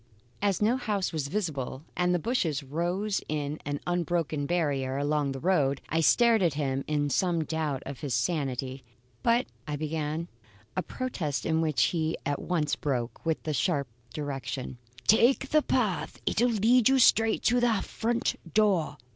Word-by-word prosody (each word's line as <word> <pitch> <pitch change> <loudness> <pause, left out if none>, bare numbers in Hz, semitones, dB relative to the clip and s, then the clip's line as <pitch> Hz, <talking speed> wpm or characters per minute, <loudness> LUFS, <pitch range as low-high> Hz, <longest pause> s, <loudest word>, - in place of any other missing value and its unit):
As 200 -1 +1
no 235 +4 +3
house 205 -8 -1
was 150 -3 -2
visible 145 -7 -3
and 180 0 +2
the 180 - +3
bushes 165 - -1
rose 175 +8 -1
in 150 0 -2
an 145 0 -2
unbroken 170 -4 -1
barrier 140 -6 0
along 145 0 0
the 135 - -5
road, 145 -5 +2
I 165 - +1
stared 230 +5 +5
at 170 -5 +2
him 135 -2 -1
in 145 -1 0
some 170 +2 +1
doubt 155 -4 -2
of 135 -2 -6
his 135 -5 -2
sanity. 135 -2 -2 0.4
"But 235 +2 +3
" - - -35
I 150 - -2
began; 155 +2 -3 0.5
a 185 - +1
protest 180 - -3
into 160 0 +2
which 155 -5 +2
he 160 -2 0
at 145 -1 -1
once 160 -5 0
broke, 125 -5 -3
with 160 - 0
the 155 - -2
sharp 145 -2 0 0.2
direction: 135 -3 -5 0.3
"Take 255 +5 +4
the 305 - +4
path. 220 - -1
It'll 245 +3 +2
lead 230 +2 +4
you 270 - +4
straight 225 -3 +4
to 245 +1 +3
the 230 -5 +2
front 235 +1 -1 0.2
door." 190 -9 +2
160 Hz, 165 wpm, -28 LUFS, 145-205 Hz, 0.5 s, stared